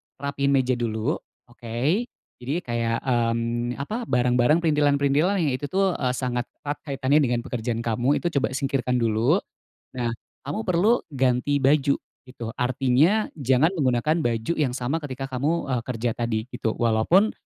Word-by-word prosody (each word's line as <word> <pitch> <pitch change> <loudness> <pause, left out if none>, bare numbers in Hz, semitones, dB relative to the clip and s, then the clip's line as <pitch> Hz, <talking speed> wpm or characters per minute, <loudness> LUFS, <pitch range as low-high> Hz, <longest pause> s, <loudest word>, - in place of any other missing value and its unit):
rapikan 140 0 -2
meja 130 -1 +2
dulu, 110 -2 -1 0.3
oke. 115 -2 -9 0.6
Jadi 140 +8 -2
kayak, 115 -1 -1
mmm, 120 -1 0
apa, 225 +10 -4
barang-barang 125 +5 +3
printilan-printilan 150 +4 +2
yang 145 - +1
itu 145 - -4
tuh 195 +2 +1 0.2
sangat 125 -1 -2 0.2
erat 145 0 -3
kaitannya 135 +1 +1
dengan 120 -5 +1
pekerjaan 115 -1 -3
kamu, 120 +5 +1
itu 175 - 0
coba 130 - -1
singkirkan 135 -2 0
dulu. 115 - +2 0.5
Nah, 120 -2 -1 0.3
kamu 145 +10 -4
perlu 190 +7 +4 0.2
ganti 130 +2 +1
baju, 140 0 +4 0.3
itu, 125 -2 -8
artinya 135 - +2
jangan 135 +3 +3
menggunakan 140 +3 +1
baju 115 +3 0
yang 130 -5 +1
sama 130 +4 -1
ketika 135 -3 -6
kamu, 145 +5 -1
eee, 125 -2 0
kerja 120 -1 -1
tadi 115 -2 -1
gitu, 115 -2 -2
walaupun 120 - +3
130 Hz, 145 wpm, -24 LUFS, 120-145 Hz, 0.6 s, perlu